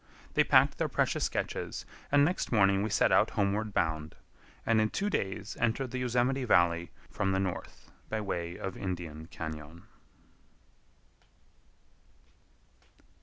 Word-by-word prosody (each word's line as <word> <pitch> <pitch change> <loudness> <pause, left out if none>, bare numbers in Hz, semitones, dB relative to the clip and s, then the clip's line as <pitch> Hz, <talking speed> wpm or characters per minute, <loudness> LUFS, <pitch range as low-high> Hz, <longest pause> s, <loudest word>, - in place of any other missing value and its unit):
They - - +5
packed - - +4
their - - 0
precious - - +1
sketches, - - -3 0.3
and 145 0 +6
next 175 +4 -1
morning 100 -3 +4
we 110 - -1
set 100 - +3
out - - +5
homeward 105 +2 0
bound, 80 -4 -1 0.5
and 115 -1 +3
in 110 - +2
two 205 - -1
days 100 - -2
entered 120 +2 0
the 130 - -3
Yosemite 125 +2 +1
Valley 85 -6 +3 0.2
from 95 0 0
the 95 - +1
north 95 -2 -5 0.2
by 110 - -1
way 85 -4 -3
of 95 -1 -5
Indian 85 -4 -5
Cañon. 80 0 -7
100 Hz, 130 wpm, -30 LUFS, 85-115 Hz, 0.5 s, and